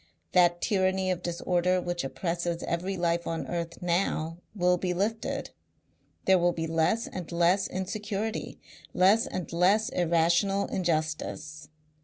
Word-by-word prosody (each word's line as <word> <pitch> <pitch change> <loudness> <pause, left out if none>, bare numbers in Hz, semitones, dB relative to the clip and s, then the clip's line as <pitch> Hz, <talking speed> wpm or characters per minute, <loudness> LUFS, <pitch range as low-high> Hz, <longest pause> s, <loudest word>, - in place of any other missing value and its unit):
That 175 -1 +4
tyranny 190 -2 +1
of 180 -1 -2
disorder 180 +1 +1
which 175 -1 -3
oppresses 170 +4 -2
every 185 +3 -2
life 170 -1 0
on 165 -1 -2
earth 170 0 -4
now 170 -2 0 0.2
will 180 -2 +3
be 180 0 -2
lifted. 220 +4 -2 0.7
There 190 -1 +5
will 175 0 +2
be 165 -1 -3
less 165 +8 +1
and 180 -3 -7
less 175 +3 +3
insecurity, 210 +3 -4 0.4
less 195 +5 +4
and 180 -2 -5
less 195 +6 +3
irrational 175 +3 +2
injustice. 155 -3 -2
175 Hz, 130 wpm, -28 LUFS, 170-190 Hz, 0.7 s, There